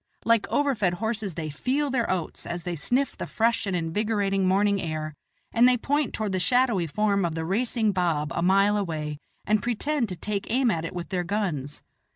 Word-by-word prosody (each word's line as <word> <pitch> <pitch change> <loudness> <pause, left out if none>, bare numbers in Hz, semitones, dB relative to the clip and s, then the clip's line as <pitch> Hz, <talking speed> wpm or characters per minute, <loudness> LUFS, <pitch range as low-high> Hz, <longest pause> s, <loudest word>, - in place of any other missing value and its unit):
Like 230 -2 +3
overfed 230 -11 +1
horses 215 -3 -3
they 155 -2 -4
"feel 270 - -1
their 245 -3 0
oats" 180 -4 -2
as 170 0 -4
they 175 -1 -3
sniff 255 - 0
the - - -5
fresh 230 -1 +1
and 190 - 0
invigorating 195 +3 0
morning 200 +1 +3
air, 155 -1 -3 0.4
and 240 +2 +6
they 250 - +3
point 285 +2 0
toward 215 -2 -2
the 185 - 0
shadowy 235 -5 +2
form 200 +3 +1
of 165 -2 -1
the 160 0 -2
racing 220 +3 +1
baab 165 -5 0
a - - -1
mile 195 +3 +4
away, 155 -6 -3 0.3
and 215 0 +2
pretend 245 +1 -1
to 180 - -4
take 200 +3 -4
aim 250 0 +3
at 165 -3 -2
it 175 - -6
with 175 -1 -5
their 180 -2 -1
guns. 170 -8 -2
200 Hz, 195 wpm, -26 LUFS, 170-230 Hz, 0.4 s, and